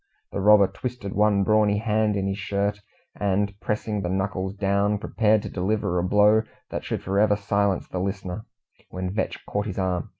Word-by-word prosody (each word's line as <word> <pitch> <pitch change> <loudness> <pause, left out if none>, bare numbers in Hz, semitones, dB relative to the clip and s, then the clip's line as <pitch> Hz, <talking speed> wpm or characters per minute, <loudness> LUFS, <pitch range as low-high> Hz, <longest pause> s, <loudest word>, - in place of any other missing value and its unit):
The 100 - -3
robber 105 0 +7
twisted 120 -1 -5
one 105 -1 +3
brawny 105 0 +3
hand 110 -1 +1
in 100 -1 -1
his 100 +1 -2
shirt, 100 +2 -1 0.4
and 100 0 0
pressing 105 0 -2
the 90 - -2
knuckles 95 0 -2
down, 100 +1 +1
prepared 110 0 +1
to - - -5
deliver 95 -1 -1
a - - 0
blow 105 +3 +4 0.3
that - - -4
should - - -4
for 95 +2 0
ever 105 0 +4
silence 100 -1 0
the 90 - -4
listener, 95 +2 -4 0.4
when 90 0 -4
Vetch 110 - -3
caught 105 +1 -2
his 95 - -5
arm. 90 -3 -1
100 Hz, 180 wpm, -25 LUFS, 95-105 Hz, 0.4 s, robber